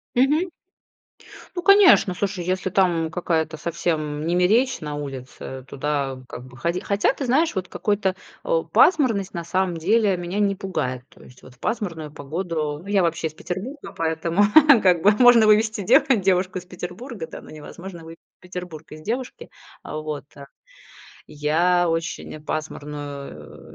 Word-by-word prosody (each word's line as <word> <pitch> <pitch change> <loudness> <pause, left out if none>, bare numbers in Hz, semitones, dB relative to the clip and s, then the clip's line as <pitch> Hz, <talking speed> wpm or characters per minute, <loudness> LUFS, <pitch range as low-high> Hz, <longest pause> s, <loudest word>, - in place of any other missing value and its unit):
Мгм. 300 +8 +3 1.1
Ну, 355 - -2
конечно. 385 - +6
Слушай, 195 -3 -3
если 185 0 -1
там 170 -4 +2
какая-то 160 -2 -1
совсем 155 -3 -2
немеречь 180 +10 +2
на 150 -1 -5
улице, 130 -2 -7
туда 140 -2 -2
как 125 - -9
бы 125 0 -14
ход 170 +5 -1
хотя 200 +4 +1
ты 275 - -4
знаешь, 290 +7 +2
вот 185 -2 -3
какой-то 195 -1 -1 0.3
о, - - +1
пасмурность 230 - +3
на 170 - -3
самом 180 0 -1
деле 200 +3 +2
меня 175 +3 -4
не 200 -1 +2
пугает. 130 -10 -3
То - - -20
есть 125 - -17
вот 130 - -14
в 125 - -26
пасмурную 165 -10 -3
погоду- 150 0 -4
ну, 195 - -14
я 200 -2 +2
вообще 165 -1 0
из 155 - -11
Петербурга,- 210 - -6
поэтому 165 +3 0 0.4
как 175 -3 +3
бы, 205 - +7
можно 245 -3 +7
вывести 215 0 +3
дево 260 - +4
девушку 185 -2 +1
из 180 - -7
Петербурга, 185 - -7
да, - - -9
но - - -14
невозможно 170 +3 -10
вывезти 165 +1 -12 0.2
Петербург 180 -3 -8
из 155 0 -10
девушки. 245 +8 -5 0.4
Э, - - -7
вот, 155 -1 -5 1.0
я 165 +4 +2
очень 165 -2 -4
пасмурную 145 - -7
175 Hz, 150 wpm, -23 LUFS, 155-205 Hz, 1.1 s, бы